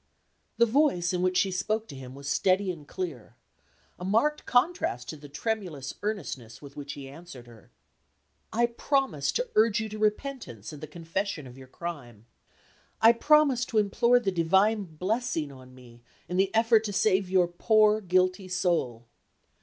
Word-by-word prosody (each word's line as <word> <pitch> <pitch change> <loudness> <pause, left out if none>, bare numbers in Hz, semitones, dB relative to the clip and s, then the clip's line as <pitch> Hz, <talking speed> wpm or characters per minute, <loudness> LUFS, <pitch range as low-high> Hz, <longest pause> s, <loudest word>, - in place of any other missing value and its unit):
The 235 - +6
voice 225 - +2
in 180 - 0
which 185 0 +1
she 195 - +2
spoke 215 +4 -1
to - - -8
him 130 -1 -10
was 140 0 -9
steady 190 +4 +2
and 155 -5 -11
clear; 165 -11 -6 0.6
a - - -7
marked 230 +11 +1
contrast 250 - +1
to - - -5
the 145 -1 -12
tremulous 155 - -4
earnestness 145 - -5
with 140 -1 -13
which 145 0 -6
he 140 -1 -9
answered 140 -3 -11
her. 115 -2 -17 0.8
"I 235 +2 +2
promise 235 - 0
to - - -1
urge 215 -1 +4
you 220 - -3
to 215 +1 -7
repentance 210 - -2
and 150 - -10
the 155 - -6
confession 165 +1 -4
of 125 -1 -11
your 130 -1 -13
crime. 130 -9 -8 0.7
I 225 +1 +7
promise 290 -1 +4
to 230 - -3
implore 235 +4 +3
the 200 -5 -1
divine 190 +5 +2
blessing 180 - -2
on 130 -1 -14
me 120 -2 -16 0.3
in 180 - -3
the 190 0 +3
effort 225 -1 +4
to 205 - -3
save 190 -1 +2
your 185 -2 +3
poor 215 +4 +3
guilty 185 0 +1
soul." 170 -11 -1
185 Hz, 170 wpm, -28 LUFS, 145-220 Hz, 0.8 s, I